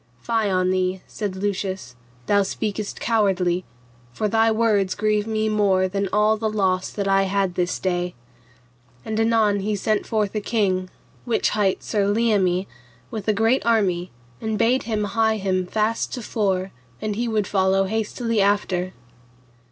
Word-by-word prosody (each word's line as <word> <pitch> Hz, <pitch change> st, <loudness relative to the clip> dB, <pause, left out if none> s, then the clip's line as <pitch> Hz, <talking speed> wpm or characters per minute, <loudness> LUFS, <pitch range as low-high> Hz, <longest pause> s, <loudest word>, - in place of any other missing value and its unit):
Fie 225 Hz, -3 st, 0 dB
on 185 Hz, -1 st, +1 dB
thee, 185 Hz, 0 st, -1 dB
said 205 Hz, -3 st, -4 dB
Lucius, 190 Hz, -7 st, -3 dB, 0.3 s
thou 205 Hz, 0 st, +3 dB
speakest 205 Hz, +1 st, -3 dB
cowardly; 185 Hz, -5 st, +1 dB, 0.5 s
for 210 Hz, -, -1 dB
thy 225 Hz, +2 st, +3 dB
words 215 Hz, -4 st, +2 dB
grieve 210 Hz, 0 st, +1 dB
me 220 Hz, -1 st, 0 dB
more 200 Hz, -3 st, +2 dB
than 195 Hz, +1 st, -2 dB
all 210 Hz, +1 st, +3 dB
the 220 Hz, 0 st, -1 dB
loss 190 Hz, -3 st, 0 dB
that 200 Hz, -1 st, -3 dB
I 195 Hz, 0 st, +3 dB
had 195 Hz, -2 st, 0 dB
this 180 Hz, 0 st, -1 dB
day. 180 Hz, -1 st, -2 dB, 0.9 s
And 220 Hz, 0 st, -2 dB
anon 225 Hz, -3 st, +3 dB
he 210 Hz, +2 st, -1 dB
sent 210 Hz, +1 st, 0 dB
forth 210 Hz, -3 st, 0 dB
a 215 Hz, -, -1 dB
king, 190 Hz, -4 st, 0 dB, 0.3 s
which 235 Hz, -2 st, +1 dB
hight 205 Hz, -3 st, 0 dB
Sir 205 Hz, -2 st, 0 dB
Leomie, 200 Hz, -4 st, +2 dB, 0.5 s
with 215 Hz, -3 st, -5 dB
a 215 Hz, -, +4 dB
great 225 Hz, +5 st, +2 dB
army, 190 Hz, -6 st, +1 dB, 0.3 s
and 220 Hz, -1 st, -2 dB
bade 235 Hz, +4 st, +3 dB
him 215 Hz, -2 st, 0 dB
hie 220 Hz, +1 st, +1 dB
him 185 Hz, -2 st, -1 dB
fast 220 Hz, +3 st, 0 dB
to 245 Hz, -, -6 dB
fore, 195 Hz, -4 st, -1 dB, 0.3 s
and 215 Hz, -1 st, -2 dB
he 235 Hz, +3 st, -1 dB
would 215 Hz, -3 st, 0 dB
follow 190 Hz, 0 st, +2 dB
hastily 220 Hz, +2 st, -1 dB
after. 190 Hz, -2 st, +1 dB
205 Hz, 160 wpm, -23 LUFS, 190-220 Hz, 0.9 s, a